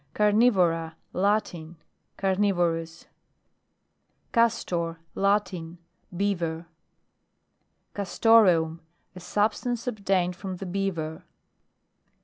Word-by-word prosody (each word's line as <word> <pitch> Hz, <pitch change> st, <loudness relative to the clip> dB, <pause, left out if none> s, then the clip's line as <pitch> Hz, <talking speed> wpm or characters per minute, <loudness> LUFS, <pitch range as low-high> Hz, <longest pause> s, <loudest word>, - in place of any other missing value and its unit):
CARNIVORA, 190 Hz, -7 st, +3 dB, 0.2 s
Latin. 180 Hz, -4 st, -1 dB, 0.4 s
Carnivorou 175 Hz, -4 st, 0 dB, 1.3 s
CASTOR. 175 Hz, -8 st, +1 dB, 0.2 s
Latin. 195 Hz, -4 st, 0 dB, 0.4 s
Beaver. 170 Hz, -4 st, -1 dB, 1.3 s
CASTOREUM. 185 Hz, -5 st, +3 dB, 0.3 s
A -, -, -8 dB
substance 220 Hz, +6 st, -1 dB
obtained 195 Hz, -6 st, 0 dB
from 190 Hz, 0 st, -6 dB
the 195 Hz, -, -6 dB
Beaver. 175 Hz, -4 st, -3 dB
185 Hz, 65 wpm, -26 LUFS, 165-205 Hz, 1.3 s, CARNIVORA